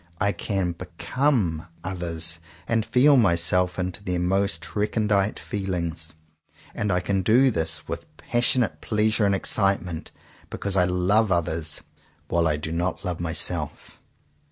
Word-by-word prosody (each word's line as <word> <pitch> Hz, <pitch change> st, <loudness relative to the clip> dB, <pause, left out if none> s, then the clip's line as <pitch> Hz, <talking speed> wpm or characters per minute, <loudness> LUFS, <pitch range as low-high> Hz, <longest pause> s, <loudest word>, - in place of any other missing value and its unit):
I 100 Hz, -1 st, +2 dB
can 95 Hz, -1 st, -2 dB
become 90 Hz, -, -1 dB, 0.2 s
others 85 Hz, -2 st, -1 dB, 0.3 s
and 115 Hz, -1 st, +1 dB
feel 130 Hz, +6 st, +5 dB
myself 90 Hz, -3 st, +2 dB
into 90 Hz, +2 st, -3 dB
their 90 Hz, -2 st, -1 dB
most 90 Hz, -1 st, -1 dB
recondite 105 Hz, -1 st, +1 dB
feelings; 85 Hz, -5 st, -4 dB, 0.6 s
and 105 Hz, -1 st, -1 dB
I 90 Hz, -, +2 dB
can 95 Hz, +1 st, 0 dB
do 125 Hz, +8 st, +4 dB
this 80 Hz, -4 st, -1 dB
with -, -, -5 dB
passionate 120 Hz, -1 st, +1 dB
pleasure 110 Hz, 0 st, +2 dB
and 100 Hz, -, +2 dB
excitement, 95 Hz, -4 st, 0 dB, 0.4 s
because 100 Hz, -1 st, -4 dB
I 90 Hz, -2 st, +4 dB
love 95 Hz, +4 st, +2 dB
others, 80 Hz, -3 st, -1 dB, 0.5 s
while 85 Hz, -1 st, +2 dB
I 75 Hz, -1 st, +1 dB
do 75 Hz, +2 st, -5 dB
not 90 Hz, +4 st, -2 dB
love 90 Hz, -2 st, -2 dB
myself. 80 Hz, -2 st, 0 dB
90 Hz, 130 wpm, -25 LUFS, 85-105 Hz, 0.6 s, feel